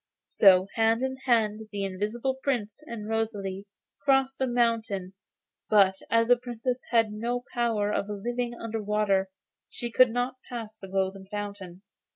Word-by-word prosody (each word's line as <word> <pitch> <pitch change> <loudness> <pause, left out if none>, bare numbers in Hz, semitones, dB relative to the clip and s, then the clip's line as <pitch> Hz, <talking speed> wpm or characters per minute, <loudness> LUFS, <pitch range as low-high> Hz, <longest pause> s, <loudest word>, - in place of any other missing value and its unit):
So 185 -2 +6
hand 225 +2 +2
in 265 0 -1
hand 220 -3 +1
the 200 -1 -3
invisible 215 +7 -2
Prince 240 -3 -2
and 215 -3 -6
Rosalie 205 -3 -2 0.4
crossed 270 +1 +2
the 265 - +1
mountain; 225 -6 0 0.6
but 195 -2 +5
as 230 0 +3
the 245 0 +6
Princess 245 +1 -3
had 225 -3 +3
no 240 +3 -2
power 225 -4 +1
of 200 - -1
living 240 +4 -3
under 225 -1 -4
water, 205 -2 +1 0.4
she 240 -1 -5
could 255 +1 +6
not 245 +2 -2
pass 225 -3 -6
the 195 - -11
Golden 190 0 -2
Fountain. 200 -3 -6
220 Hz, 150 wpm, -27 LUFS, 200-240 Hz, 0.6 s, So